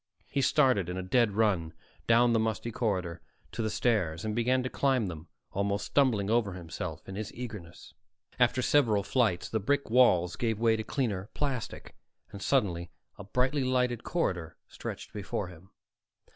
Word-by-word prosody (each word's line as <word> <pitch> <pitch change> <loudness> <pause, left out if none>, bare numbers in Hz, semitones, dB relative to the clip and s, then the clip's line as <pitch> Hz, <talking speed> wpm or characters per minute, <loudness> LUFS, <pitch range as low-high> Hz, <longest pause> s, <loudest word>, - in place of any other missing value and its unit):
He 140 - +1
started 130 - +3
in 90 - -3
a 95 - -3
dead 115 +2 +2
run 95 -7 +1 0.3
down 120 +1 +5
the 115 - +3
musty 110 +1 -1
corridor 95 -8 -2 0.3
to - - -4
the 110 - 0
stairs 105 -7 0
and 105 -1 -2
began 125 +2 +2
to 130 - -2
climb 130 -5 +2
them, 80 -2 -7 0.2
almost 100 +1 -1
stumbling 120 -8 +2
over 110 -3 +1
himself 85 -2 -6
in 95 - -7
his 105 +2 -5
eagerness. 105 -9 -8 0.5
After 130 - +3
several 115 -9 +3
flights, 110 -7 +1
the 110 - -1
brick 140 +4 0
walls 90 -9 +4
gave 115 -3 0
way 115 0 +3
to 110 - -3
cleaner 105 -7 -2
plastic, 135 -6 -3 0.4
and 100 - -9
suddenly 90 -11 +1 0.3
a - - -6
brightly 130 +7 0
lighted 125 -2 +1
corridor 90 - -2
stretched - - -7
before 100 -2 -3
him. 90 +1 -14
110 Hz, 165 wpm, -30 LUFS, 95-125 Hz, 0.5 s, down